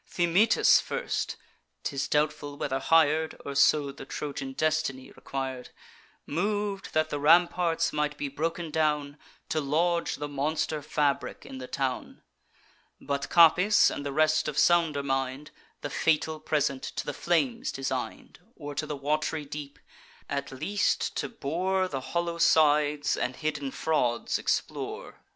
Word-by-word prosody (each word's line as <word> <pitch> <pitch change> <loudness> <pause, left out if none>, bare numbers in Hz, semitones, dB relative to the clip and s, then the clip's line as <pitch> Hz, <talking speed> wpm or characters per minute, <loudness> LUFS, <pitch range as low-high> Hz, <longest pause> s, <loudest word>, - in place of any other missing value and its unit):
Thymoetes 180 +6 +4
first - - -3 0.5
('tis 140 -1 -2
doubtful 150 -1 -1
whether 135 -2 -2
hir'd, 160 +1 +3
Or 140 - -4
so 140 +1 +3
the 135 - -10
Trojan 135 -1 -5
destiny 155 -3 -1
requir'd) 130 -2 -5 0.6
Mov'd 200 +4 -2
that 155 0 +1
the 145 - -2
ramparts 165 +1 +3
might 150 0 -1
be 145 - -3
broken 165 +3 -3
down, 150 -2 0 0.3
To 155 - 0
lodge 170 +4 +1
the 145 - -5
monster 150 +2 -1
fabric 145 -1 -1
in 130 - -8
the 130 - -7
town. 135 -1 -3 0.8
But 140 0 -3
Capys, 180 +5 +6
and - - -5
the 140 - -3
rest 155 +2 +2
of 150 -1 -4
sounder 165 -5 +3
mind, 135 +1 -2 0.3
The 145 - -5
fatal 160 0 +1
present 140 -4 0
to - - -5
the 145 - -3
flames 230 - 0
designed, 135 0 -5 0.2
Or 145 0 -7
to 150 +2 -3
the 150 - -4
wat'ry 150 +2 -1
deep; 145 0 -8 0.5
at 140 -1 -3
least 155 +10 -1
to - - -2
bore 185 +1 -1
The 135 -6 -4
hollow 170 +3 -2
sides, 150 -2 +3
and 125 +1 -2
hidden 150 -2 -3
frauds 125 -5 0
explore. - - -3
150 Hz, 140 wpm, -28 LUFS, 140-165 Hz, 0.8 s, Capys